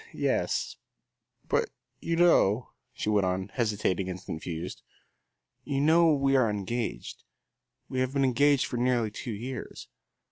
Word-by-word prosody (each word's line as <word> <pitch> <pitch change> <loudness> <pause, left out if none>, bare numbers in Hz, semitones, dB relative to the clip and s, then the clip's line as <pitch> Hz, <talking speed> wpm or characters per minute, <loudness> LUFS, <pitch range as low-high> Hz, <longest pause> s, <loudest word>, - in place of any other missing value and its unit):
"Yes, - - -1 0.7
but - - +1 0.3
you 165 - -1
know," 130 - +3 0.2
she - - -5
went 105 -3 +2
on, 95 +1 -2
hesitating 100 -5 -1
and 90 0 -5
confused, 80 +2 -5 0.8
"you 140 -2 -2
know 160 +3 +5
we 135 -2 +2
are 125 -4 +4
engaged. 105 +3 -4 0.6
We 130 - -3
have 130 0 0
been 140 -1 +2
engaged 140 +2 +3
for 125 - -4
nearly 120 -3 +1
two 105 - -7
years." 125 +5 -7
120 Hz, 135 wpm, -28 LUFS, 100-135 Hz, 0.8 s, know